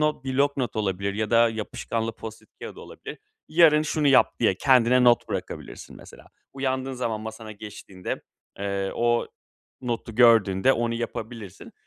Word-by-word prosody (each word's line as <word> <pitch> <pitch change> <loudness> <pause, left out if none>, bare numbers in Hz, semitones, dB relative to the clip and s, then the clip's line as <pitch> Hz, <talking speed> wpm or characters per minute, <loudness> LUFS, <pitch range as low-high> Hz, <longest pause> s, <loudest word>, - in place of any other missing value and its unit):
not, 150 -3 0
blok 140 +2 +1
not 125 -6 -2
olabilir 100 -1 -1
ya 110 +1 -2
da 115 0 +5
yapışkanlı 110 +1 -4
Post-it 110 -1 -10
kâğıdı - - -8
olabilir. - - -10 0.3
"Yarın 155 -2 +5
şunu 150 -1 +1
yap!" 135 - +4
diye 110 -5 +3
kendine 125 +1 +4
not 120 -1 +4
bırakabilirsin - - -6
mesela. - - -15 0.3
Uyandığın 135 -1 -2
zaman 115 -4 -3
masana 110 0 -8
geçtiğinde, 100 -3 -7 0.4
eee, 100 -1 -2
o 120 0 +1 0.5
notu 120 -2 -4
gördüğünde 115 -1 +5
onu 115 -2 -1
yapabilirsin. 115 -3 -7
115 Hz, 140 wpm, -25 LUFS, 110-130 Hz, 0.5 s, da